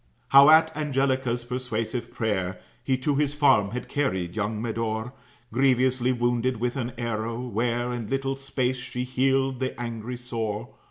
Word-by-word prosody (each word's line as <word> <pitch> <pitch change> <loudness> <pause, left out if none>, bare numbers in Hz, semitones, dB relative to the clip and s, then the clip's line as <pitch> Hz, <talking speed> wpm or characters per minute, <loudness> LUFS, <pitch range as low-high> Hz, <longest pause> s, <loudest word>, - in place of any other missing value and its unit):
"How 140 +2 +8
at 160 0 +6
Angelica's 130 -4 0
persuasive 120 -1 -3
prayer, 95 -5 -2 0.2
He 130 0 +1
to 135 +3 0
his 145 -1 +1
farm 135 -9 +4
had 125 +4 -5
carried 95 - -1
young 105 0 -1
Medore, 115 +1 -2 0.4
Grievously 130 -1 +3
wounded 120 0 0
with 120 +3 -1
an 120 -2 -3
arrow; 115 -1 -2
where 120 +1 -1
In 115 -3 -5
little 135 0 -1
space 130 -2 -1
she 125 0 -4
healed 130 0 +1
the 130 -2 -3
angry 120 0 -5
sore. 115 -2 -4
125 Hz, 150 wpm, -26 LUFS, 115-130 Hz, 0.4 s, How